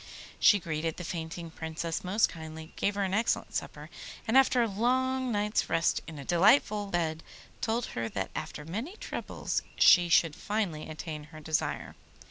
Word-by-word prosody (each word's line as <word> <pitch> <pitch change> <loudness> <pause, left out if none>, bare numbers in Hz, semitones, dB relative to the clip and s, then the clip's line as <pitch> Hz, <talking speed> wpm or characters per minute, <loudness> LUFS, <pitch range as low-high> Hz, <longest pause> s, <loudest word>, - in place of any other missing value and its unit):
She 205 - +7
greeted 160 -3 -3
the 175 - -5
fainting 165 0 -5
Princess 160 +1 -4
most 195 +4 +3
kindly, 160 -1 -9
gave 200 - 0
her 200 - 0
an 190 -1 -1
excellent 225 +3 0
supper, - - -5 0.4
and 225 - +1
after 255 -2 +5
a - - +1
long 255 +4 +1
night's 210 0 0
rest 165 - +2
in 160 -1 -8
a 140 - -8
delightful 205 +3 +4
bed 165 -4 -1 0.4
told 230 +1 0
her 115 -1 -2
that 95 -3 -3
after 150 - -6
many 225 - -5
troubles - - -3
she 175 -1 +6
should 165 -2 +4
finally 200 -9 -2
attain 155 -1 -6
her 155 +1 -12
desire. 155 +1 -2
175 Hz, 165 wpm, -30 LUFS, 160-215 Hz, 0.4 s, She